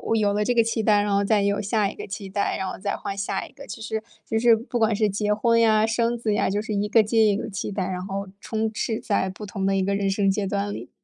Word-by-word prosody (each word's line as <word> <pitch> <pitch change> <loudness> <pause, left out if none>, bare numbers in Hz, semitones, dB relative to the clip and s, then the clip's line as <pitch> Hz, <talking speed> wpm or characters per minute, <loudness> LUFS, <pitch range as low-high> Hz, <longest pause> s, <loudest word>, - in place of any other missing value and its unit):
有 205 -2 +2
了 210 +1 0
这 245 - +2
个 230 -1 +4
期 225 -1 -1
待， 210 -1 +4
然 205 0 -1
后 200 0 +3
再 205 0 +2
有 200 0 +1
下 210 0 +1
一 - - -9
个 - - -7
期 195 0 -7
待， 200 +1 -1
然 190 - -3
后 - - -7
再 200 +1 -2
换 200 - -5
下 200 - -2
一 - - -18
个。 280 0 -12
其 225 - -8
实 220 0 -3 0.2
其 225 - 0
实 235 -1 +6
不 240 +2 -4
管 220 -2 +2
是 215 -1 +2
结 210 +1 0
婚 230 +2 +2
呀， 220 -1 +4
生 230 +1 +1
子 230 -2 -2
呀、 - - +1
就 205 +1 0
是 215 -1 -4
一 205 +1 0
个 220 +1 +5
接 220 +1 +3
一 205 -1 +3
个 220 - -4
期 195 +1 -4
待， 190 -2 -2
然 185 0 -4
后， 195 0 -4
充 220 0 -2
斥 220 +1 -2
在 200 -3 0
不 190 +3 -8
同 195 0 -3
的 195 0 +2
一 190 - +1
个 200 +1 0
人 200 -1 0
生 195 0 +2
阶 200 +1 0
段 200 +1 -2
里。 - - -7
210 Hz, 320 characters per minute, -24 LUFS, 200-220 Hz, 0.2 s, 实